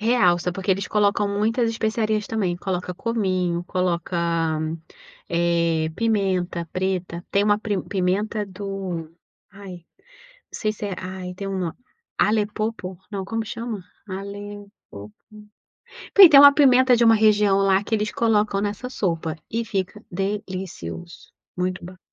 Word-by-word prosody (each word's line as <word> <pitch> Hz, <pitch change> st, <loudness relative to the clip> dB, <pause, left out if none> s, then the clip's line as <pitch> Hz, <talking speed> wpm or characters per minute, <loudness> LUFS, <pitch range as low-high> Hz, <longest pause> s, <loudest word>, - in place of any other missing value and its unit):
Realça, 180 Hz, -7 st, +2 dB
porque 195 Hz, 0 st, -3 dB
eles 195 Hz, +1 st, +1 dB
colocam 205 Hz, -1 st, +2 dB
muitas 225 Hz, +4 st, +1 dB
especiarias 220 Hz, -1 st, -1 dB
também, 190 Hz, -6 st, -1 dB
coloca 180 Hz, -1 st, -3 dB
cominho, 185 Hz, -5 st, -1 dB
coloca, 180 Hz, -1 st, -1 dB, 1.1 s
eh, 170 Hz, -2 st, +1 dB
pimenta 190 Hz, -6 st, 0 dB
preta, 185 Hz, -2 st, -2 dB
tem 200 Hz, -, +3 dB
uma 205 Hz, 0 st, +3 dB
pri 205 Hz, -3 st, -2 dB
pimenta 205 Hz, +3 st, -1 dB
do, 190 Hz, -4 st, -5 dB, 0.4 s
ai, 185 Hz, -3 st, -11 dB, 0.5 s
não -, -, -30 dB
sei 215 Hz, 0 st, 0 dB
se 210 Hz, -1 st, -6 dB
é 190 Hz, -3 st, -4 dB
ai 185 Hz, -1 st, -6 dB
tem 195 Hz, +1 st, -6 dB
uma, 185 Hz, -4 st, -3 dB, 0.4 s
alepopo 210 Hz, -3 st, -1 dB
não 195 Hz, -3 st, -4 dB
como 225 Hz, +2 st, -3 dB
chama? 230 Hz, -2 st, -5 dB, 0.3 s
Alepopo, 200 Hz, -, -9 dB, 1.0 s
porque 390 Hz, -4 st, +10 dB
tem 280 Hz, -2 st, +9 dB
uma 285 Hz, 0 st, +10 dB
pimenta 260 Hz, -3 st, +5 dB
de 235 Hz, -, +3 dB
uma 225 Hz, 0 st, +7 dB
região 210 Hz, -2 st, +4 dB
lá 195 Hz, 0 st, +3 dB
que 225 Hz, -, -1 dB
eles 210 Hz, -1 st, 0 dB
colocam 210 Hz, -3 st, +1 dB
nessa 210 Hz, +5 st, -3 dB
sopa, 165 Hz, -8 st, -2 dB
e 230 Hz, +1 st, -2 dB
fica 200 Hz, +1 st, -3 dB
delicioso, 190 Hz, -2 st, -5 dB, 0.3 s
muito 180 Hz, -1 st, -2 dB
ba 185 Hz, +1 st, -11 dB
200 Hz, 135 wpm, -23 LUFS, 180-215 Hz, 1.1 s, porque